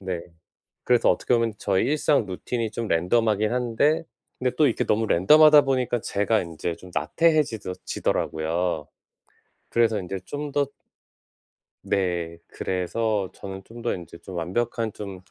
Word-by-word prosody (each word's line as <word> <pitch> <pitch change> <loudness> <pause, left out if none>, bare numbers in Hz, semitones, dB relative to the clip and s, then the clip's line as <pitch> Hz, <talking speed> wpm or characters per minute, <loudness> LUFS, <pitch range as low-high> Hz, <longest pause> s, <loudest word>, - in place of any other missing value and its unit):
네. 95 -3 -3 0.6
그래서 125 -1 +4
어떻게 - - 0
보면 115 -2 +1
저의 95 -2 +1
일상 145 -3 +2
루틴이 110 +4 -3
좀 115 0 -4
랜덤하긴 105 +5 +2
한데 125 +6 +1 0.4
근데 125 -1 +1
또 155 - +5
이렇게 120 - 0
너무 110 +1 +1
랜덤하다 150 - +7
보니까 130 -3 0
제가 105 +3 +1
인제 85 0 -4
좀 95 - -13
나태해 160 -2 +3
지더 110 -7 -6
지더라고요. 80 0 -1 0.8
그래서 115 -2 +2
인제 95 +1 -5
좀 145 0 -5
더 145 0 +2 1.2
네. 85 -4 -1
그래서 100 +2 -2
저는 95 0 -8
좀 115 +3 -12
더 - - 0
인제 85 -2 -9
좀 95 - -10
완벽한 115 +6 -1
좀 100 -3 -8
110 Hz, 295 characters per minute, -25 LUFS, 90-125 Hz, 1.2 s, 랜덤하다